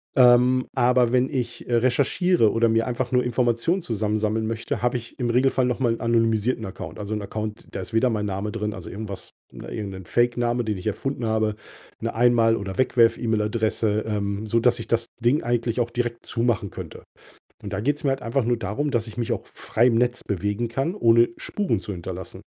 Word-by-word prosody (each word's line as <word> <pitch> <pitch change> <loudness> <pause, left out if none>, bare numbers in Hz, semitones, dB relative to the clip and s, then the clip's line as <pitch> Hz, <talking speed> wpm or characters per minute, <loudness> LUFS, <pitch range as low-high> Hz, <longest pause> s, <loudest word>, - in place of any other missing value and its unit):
Ähm, 125 0 +5
aber 125 -1 +3
wenn 130 +1 +3
ich, 120 -3 -4
äh, 120 - +2
recherchiere 130 - +3
oder 115 0 +3
mir 115 0 +2
einfach 125 0 -3
nur 125 0 +4
Informationen 125 - +1
zusammensammeln 110 -2 -1
möchte, 115 +1 -3
habe 120 0 +1
ich 115 -1 -10
im 120 -2 0
Regelfall 130 +2 +2
noch 125 +1 -1
mal 120 -3 +2
'n - - -6
anonymisierten 115 0 +1
Account. 95 - -8
Also, 105 +1 -4
'n 105 - -2
Account, 105 +1 -5
da 100 - -5
ist 100 - -8
weder 120 +3 +3
mein 105 -3 -1
Name 100 +1 -3
drin, 105 -2 -3
also, 90 - -8
irgendwas 100 -1 -7 0.2
ne, - - -9
irgend 105 -3 -4
'nen 95 -2 -9
Fake 120 +4 +2
Name, 120 0 +1
den 105 -2 -1
ich 90 - -9
erfunden 125 +3 -2
habe, 110 -1 +1 0.5
'ne - - -2
Einmal 115 -1 +4
oder 95 -2 -5
Wegwerf-E-Mail-Adresse, 110 -3 +2
ähm, 100 -1 -2
sodass 115 +2 +2
ich 115 - -6
das 115 0 +1 0.2
Ding 125 +6 +2
eigentlich 120 0 0
auch 120 0 0
direkt 120 -1 -3
zumachen 115 -5 0
könnte. - - -9 0.6
Und 100 - -6
da 100 - -1
geht's 145 +7 -1
mir 140 - +2
halt 135 - -2
einfach 120 +2 0
nur 120 +1 +1
darum, 115 +8 -2
dass 115 -3 0
ich 110 - -9
mich 120 - -2
auch - - -2
f - - -19
frei 120 +3 +2
im 115 - +3
Netz 120 +1 +1
bewegen 105 +4 -1
kann, 135 +9 -1
ohne 115 - +4
Spuren 190 - -1
zu 105 - -6
hinterlassen. 90 +1 -7
115 Hz, 210 wpm, -24 LUFS, 110-125 Hz, 0.6 s, Ähm